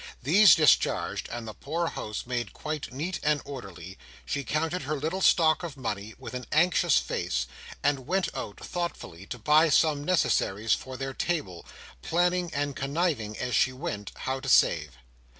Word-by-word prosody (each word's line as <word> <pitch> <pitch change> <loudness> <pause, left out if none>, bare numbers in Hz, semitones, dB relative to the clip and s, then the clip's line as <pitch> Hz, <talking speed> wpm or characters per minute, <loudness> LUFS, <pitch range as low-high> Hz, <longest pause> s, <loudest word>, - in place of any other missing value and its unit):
These 185 +9 +7
discharged, 155 -2 +2
and 120 -1 -5
the 110 - -6
poor 165 +8 -3
house 105 -1 -5
made 120 -1 -3
quite 155 -3 -5
neat 165 +8 -3
and 150 0 +2
orderly, 95 -8 -9 0.3
she 140 - -2
counted 160 +8 -1
her 150 +2 -2
little 160 +6 -3
stock 160 -4 +4
of 165 -5 -6
money, 105 -4 -4
with - - -9
an 125 -2 -6
anxious 170 +4 +4
face, - - -1 0.4
and 140 -3 0
went 190 0 +1
out - - -6
thoughtfully 100 - -5
to 125 - -6
buy 155 +7 +4
some 150 0 +3
necessaries 115 - +1
for 130 -1 -4
their 135 +1 -4
table, 115 - -3 0.3
planning 175 - +1
and 145 -1 -2
conniving, 140 -7 -1
as 125 -1 -3
she 130 - +3
went, 130 - -5
how 130 0 -2
to - - -5
save. 75 +3 +4
140 Hz, 165 wpm, -27 LUFS, 115-165 Hz, 0.4 s, These